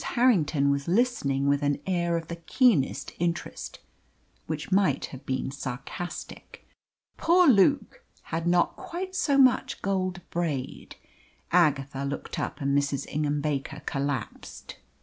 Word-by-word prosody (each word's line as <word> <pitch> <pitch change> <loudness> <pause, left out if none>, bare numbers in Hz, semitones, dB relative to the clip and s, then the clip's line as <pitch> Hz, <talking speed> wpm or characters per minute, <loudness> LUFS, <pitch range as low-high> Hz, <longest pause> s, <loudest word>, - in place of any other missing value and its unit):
Harrington 165 - +2
was 140 0 -2
listening 170 - +1
with 140 0 +2
an 145 -1 +1
air 175 -2 0
of 165 -1 -6
the 170 - -6
keenest 170 - +1
interest, 170 0 -3 0.7
which 155 +3 -4
might 185 -8 +2
have 135 +1 -10
been 130 0 -2
sarcastic. 135 +5 -7 0.5
"Poor 355 +1 +4
Luke 280 - +3 0.2
had 165 +1 -3
not 175 0 +2
quite 370 +2 -6
so 295 -6 +1
much 260 -2 +3
gold 185 -2 -1
braid 155 -7 -3 0.3
" - - -35 0.2
Agatha 135 -1 -4
looked 140 +1 -4
up, - - -4
and 140 0 +1
Mrs. 140 -1 0
Ingham 150 -1 -1
Baker 150 0 -3
collapsed. 140 -3 -4
160 Hz, 130 wpm, -27 LUFS, 140-195 Hz, 0.7 s, Poor